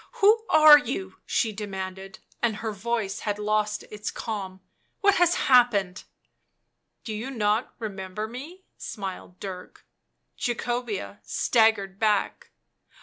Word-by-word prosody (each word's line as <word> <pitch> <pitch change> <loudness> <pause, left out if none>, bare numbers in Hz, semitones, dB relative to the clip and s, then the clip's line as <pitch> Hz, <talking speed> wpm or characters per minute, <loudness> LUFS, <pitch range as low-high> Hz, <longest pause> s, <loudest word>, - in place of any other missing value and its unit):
" - - -31
Who 445 0 +4
are 305 -1 +9
you?" 195 -9 -5
she 225 - +1
demanded, 190 -2 -6 0.2
and 230 -3 +1
her 220 +1 -4
voice 215 0 -2
had 205 -1 -2
lost 210 0 0
its 210 0 -5
calm; 195 -4 -5 0.2
" - - -45
what 400 -1 +4
has 350 0 +4
happened?" 220 -8 +3 0.5
" - - -52
Do 220 - -5
you 220 +5 -4
not 220 -2 0
remember 205 -1 -5
me?" 300 +11 -10
smiled 190 -3 -7
Dirk. 185 -2 -9 0.5
Jacobea 240 -4 -3
staggered 215 -4 +2
back. 210 -2 0
215 Hz, 130 wpm, -26 LUFS, 195-245 Hz, 0.5 s, are